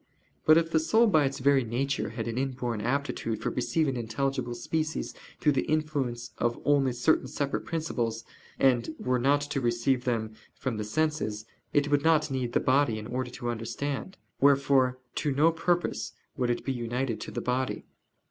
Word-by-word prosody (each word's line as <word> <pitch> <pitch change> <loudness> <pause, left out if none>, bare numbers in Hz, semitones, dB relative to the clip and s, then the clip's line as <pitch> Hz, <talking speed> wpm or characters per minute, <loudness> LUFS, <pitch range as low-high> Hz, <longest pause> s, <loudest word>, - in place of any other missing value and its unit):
But 155 +1 +8
if 165 0 +1
the 160 - +4
soul 220 +9 +4
by 155 -10 +4
its 135 0 -2
very 140 -1 +3
nature 130 +5 -1
had - - -4
an 115 - -3
inborn 125 -4 -2
aptitude 125 -3 -1
for - - -2
receiving 130 +3 0
intelligible 120 +1 -2
species 155 +6 -2 0.3
through 150 - +3
the 135 - 0
influence 140 -6 -1
of 120 0 0
only 140 -3 +3
certain 125 +6 +2
separate 140 -1 -2
principles, 120 -9 -2 0.3
and 130 +3 +2
were 125 0 0
not 140 +3 +3
to 145 -1 -2
receive 120 +2 +1
them 110 -3 -1 0.2
from 125 -5 -3
the 105 - -2
senses, 110 -4 -1 0.3
it 145 0 +2
would 145 -1 +4
not 155 -2 +3
need 125 -3 -2
the - - +4
body 130 -3 +2
in 110 - -6
order 125 +2 -3
to 120 -1 -4
understand: 140 - -4 0.2
wherefore 135 -2 +4 0.2
to 145 - 0
no 155 +4 +5
purpose 175 +1 -1 0.2
would 125 -1 0
it 120 - -1
be 135 - 0
united 120 0 -2
to - - -5
the - - -4
body. 125 +1 -1
135 Hz, 175 wpm, -28 LUFS, 120-145 Hz, 0.3 s, But